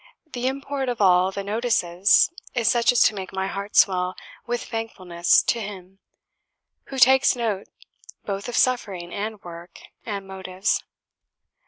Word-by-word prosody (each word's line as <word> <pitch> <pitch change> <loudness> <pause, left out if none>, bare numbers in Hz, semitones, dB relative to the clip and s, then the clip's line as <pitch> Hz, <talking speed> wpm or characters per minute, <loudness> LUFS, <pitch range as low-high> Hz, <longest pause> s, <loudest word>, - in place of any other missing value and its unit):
The 245 0 -2
import 275 0 -3
of 245 - -3
all 185 -1 +4
the 200 +1 -5
notices 200 - +2 0.2
is 235 -3 0
such 240 -1 +4
as 240 -1 +4
to - - +3
make 190 -2 -7
my 190 0 -2
heart 200 +1 -6
swell 185 -1 +3 0.3
with 240 0 -2
thankfulness 185 -7 0
to 235 - 0
Him, 195 -2 -9 0.9
who 270 - -8
takes 265 +1 +5
note 220 -5 -2 0.6
both 200 +3 -4
of 240 - -3
suffering, 195 -9 0
and 210 +1 -4
work, 170 0 -11 0.2
and 200 -3 -5
motives. 190 0 -2
200 Hz, 145 wpm, -23 LUFS, 185-240 Hz, 0.9 s, takes